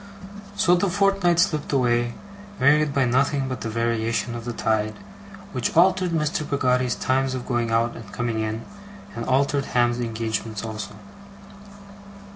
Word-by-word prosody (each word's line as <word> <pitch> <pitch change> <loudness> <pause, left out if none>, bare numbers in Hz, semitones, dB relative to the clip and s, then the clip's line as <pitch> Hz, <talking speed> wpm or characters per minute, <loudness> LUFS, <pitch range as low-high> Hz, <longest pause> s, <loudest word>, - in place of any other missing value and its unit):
So 200 -3 +3
the 180 +2 +2
fortnight 195 -2 +2
slipped 155 -3 +1
away, 120 -3 +1 0.4
varied 150 +2 +4
by 140 -1 +2
nothing 135 +2 +1
but 130 -1 -5
the 115 - -3
variation 115 +1 -1
of 115 -1 -6
the 120 - -3
tide, 110 -1 0 0.6
which 125 +3 -2
altered 185 +1 +4
Mr. 155 -2 0
Peggotty's 125 -3 +1
times 130 0 0
of 125 - -5
going 120 -2 -1
out 115 +1 +1
and 115 - -10
coming 120 -2 -2
in, 110 +1 -3 0.5
and 115 - -4
altered 140 +1 +1
Ham's 120 -1 +1
engagements 110 -2 -3
also. 105 -2 -6
125 Hz, 145 wpm, -24 LUFS, 115-145 Hz, 0.6 s, varied